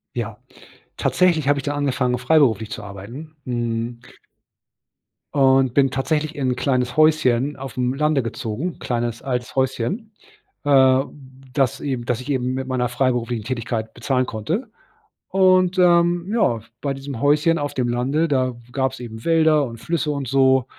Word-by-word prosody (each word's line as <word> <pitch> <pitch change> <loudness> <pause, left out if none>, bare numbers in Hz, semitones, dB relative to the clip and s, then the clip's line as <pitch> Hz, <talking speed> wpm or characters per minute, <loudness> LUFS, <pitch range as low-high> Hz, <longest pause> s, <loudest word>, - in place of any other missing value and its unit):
Ja. - - -4 0.6
Tatsächlich 170 -6 +2
habe 145 -1 +3
ich - - -6
dann 145 +1 -2
angefangen, 130 -3 0
freiberuflich 120 -5 +2
zu - - -5
arbeiten, 115 +11 -9
hm 120 -1 -2 1.4
und 135 -3 +4
bin 135 -1 +4
tatsächlich 150 +4 -1
in 135 -3 -1
'n - - -4
kleines 125 -1 0
Häuschen 150 -3 +3
aufm 130 -2 -2
Lande 150 -1 +1
gezogen, 115 +8 -4
kleines 120 -1 -2
altes 125 -2 -3
Häuschen, 135 - -1 0.5
äh, 130 -2 +5 0.5
das 135 -3 +1
eben 130 -4 -3
das 120 -1 -1
ich 130 - -7
eben 130 -2 0
mit 130 0 -3
meiner 130 -2 0
freiberuflichen 120 -2 -1
Tätigkeit 115 -2 -3
bezahlen 130 +1 0
konnte. 165 - -3 0.6
Und, 185 -1 +3
ähm, 175 -1 +4
ja, 120 - +2 0.2
bei 140 -1 -1
diesem 135 -3 -7
Häuschen 150 +3 +3
auf 145 0 -3
dem 125 -2 -1
Lande, 135 +7 0
da 130 -4 0 0.2
gab's 130 0 -1
eben 110 -2 -8
Wälder 160 -3 +4
und 115 -2 -8
Flüsse 160 +2 -1
und 140 -2 -3
so. 130 0 +3
130 Hz, 150 wpm, -21 LUFS, 125-150 Hz, 1.4 s, äh